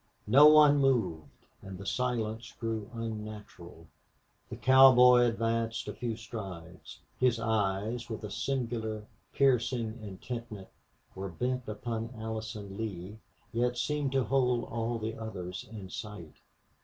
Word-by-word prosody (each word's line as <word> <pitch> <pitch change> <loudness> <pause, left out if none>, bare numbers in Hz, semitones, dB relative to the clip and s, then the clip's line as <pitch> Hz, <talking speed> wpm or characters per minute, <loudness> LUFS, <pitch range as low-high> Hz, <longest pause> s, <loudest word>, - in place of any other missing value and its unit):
No 140 +7 +8
one 150 -1 +7
moved, 120 - +1 0.3
and 95 -1 -8
the 100 - -9
silence 115 -1 -2
grew 115 -2 -3
unnatural. 105 -7 -7 0.6
The - - -6
cowboy 125 -2 +7
advanced 115 0 -1
a - - -4
few 120 -2 -3
strides. 95 -6 -9 0.2
His 125 -2 +3
eyes, 110 +1 -1
with 110 -1 -6
a 105 - -6
singular 115 -5 -3 0.3
piercing 120 -3 +1
intentness, 105 0 -7 0.4
were 95 +1 -5
bent 125 +7 -3
upon 115 +2 -4
Allison 110 -2 -6
Lee, 105 -1 -6 0.3
yet 120 +1 0
seemed 145 +1 -1
to 135 -1 +2
hold 125 0 +1
all 115 +1 -3
the 110 0 -4
others 100 0 -6
in 100 -4 -8
sight. 105 -8 -8
115 Hz, 125 wpm, -30 LUFS, 105-125 Hz, 0.6 s, No